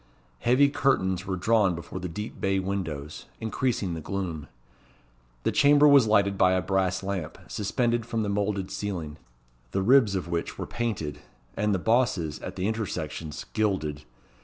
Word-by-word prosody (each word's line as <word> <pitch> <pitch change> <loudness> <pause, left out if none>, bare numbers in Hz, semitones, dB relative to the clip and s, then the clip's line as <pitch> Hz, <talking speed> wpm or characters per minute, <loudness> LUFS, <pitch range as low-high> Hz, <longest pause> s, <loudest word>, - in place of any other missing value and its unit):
Heavy 130 - +4
curtains 95 -10 +1
were 95 - -1
drawn 100 -1 +2
before 85 +2 -7
the 90 -1 -4
deep 105 +6 -6
bay 95 0 +1
windows, 85 -6 -4
increasing 110 -4 -1
the 80 - -5
gloom. 85 -4 -4 1.0
The - - +1
chamber 145 +1 +6
was 140 -5 +7
lighted 100 -2 +3
by 90 0 +5
a 95 - +2
brass 95 0 0
lamp 95 -5 -4
suspended 120 +3 0
from 115 -2 -1
the - - -2
moulded 100 -1 -1
ceiling, 85 -7 -4 0.6
the 95 - +1
ribs 115 -3 +5
of 90 -2 -2
which 85 -1 -3
were - - -4
painted, 110 -11 -3 0.4
and 105 0 +1
the 95 - +2
bosses, 100 -7 +1
at - - -7
the 95 +1 -1
intersections, 80 -8 -4
gilded. 90 -9 -1
95 Hz, 160 wpm, -27 LUFS, 90-110 Hz, 1.0 s, was